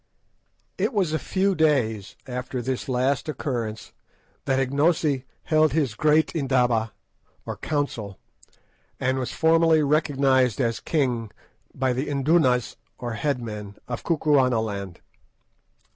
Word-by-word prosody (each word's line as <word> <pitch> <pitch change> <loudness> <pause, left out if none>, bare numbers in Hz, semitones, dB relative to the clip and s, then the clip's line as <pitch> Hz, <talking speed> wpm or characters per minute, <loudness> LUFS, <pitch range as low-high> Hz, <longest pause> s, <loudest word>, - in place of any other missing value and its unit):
It - - 0
was 185 -7 +1
a 160 - +1
few 195 +1 0
days 125 - +1
after 125 0 -4
this 130 +2 -3
last 130 +3 0
occurrence 120 -7 -4 0.5
that 135 -1 +1
Ignosi 140 0 +1 0.2
held 155 -3 +3
his 145 -8 +1
great 155 +6 +2
"indaba," 125 -6 +1 0.5
or - - -4
council, 120 -10 -3 0.8
and 130 +1 0
was 125 - -3
formally 160 -1 +4
recognised 135 -4 +2
as 115 -4 0
king 125 -8 -1 0.5
by 130 -1 +1
the 130 +4 -2
"indunas," 140 -3 +2 0.2
or 120 -2 -4
head 140 +4 -1
men, 105 -2 -7
of 120 -1 -4
Kukuanaland. 120 - +1
130 Hz, 115 wpm, -24 LUFS, 120-150 Hz, 0.8 s, formally